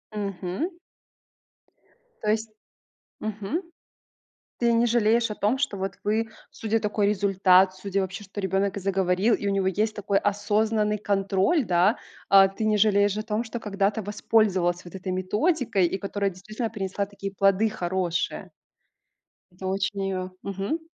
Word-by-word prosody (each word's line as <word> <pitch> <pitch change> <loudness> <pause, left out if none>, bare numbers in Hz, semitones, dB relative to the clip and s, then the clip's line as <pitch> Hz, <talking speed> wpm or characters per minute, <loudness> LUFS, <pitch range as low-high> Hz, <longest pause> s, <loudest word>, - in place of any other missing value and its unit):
Мгм. 195 - -3 1.5
То 210 - 0
есть 220 0 -1 0.7
Мгм. 215 - -3 1.0
Ты 235 -1 +3
не 230 +1 +3
жалеешь 230 0 +2
о 210 - -2
том, 215 +6 +1
что 265 -7 -1
вот 190 -1 -3
вы, 220 +2 +1 0.2
судя 225 0 -1
такой 210 -1 0
результат, 190 -2 +4
судя 195 +1 -2
вообще 190 +2 -5
что 195 +1 -6
ребенок 195 +1 0
и - - -3
заговорил, 190 +3 +2
и 205 - -5
у - - +2
него 195 -1 +1
есть 215 +3 0
такой 200 -1 +1
осознанный 210 +1 +1
контроль, 200 - +1
да. 185 +3 +3 0.3
Э, 195 -1 +8
ты 220 - -3
не 215 -1 +3
жалеешь 205 -1 +3
о 215 - -2
том, 220 +1 -2
что 230 +1 -5
когда-то 205 +1 0
воспользовалась 190 -4 +1
вот 175 - -12
этой 185 0 -4
методикой, 205 - +1
и 190 - -2
которая 200 0 -1
действительно 215 +5 -5
принесла 200 -1 -3
такие 200 -1 -7
плоды 195 +3 +3
хорошие? 180 -2 -2 1.1
Ты 190 - -7
очень 195 +1 -1
её, 185 -1 -3
мгм. 200 - -2
200 Hz, 150 wpm, -26 LUFS, 190-215 Hz, 1.5 s, Э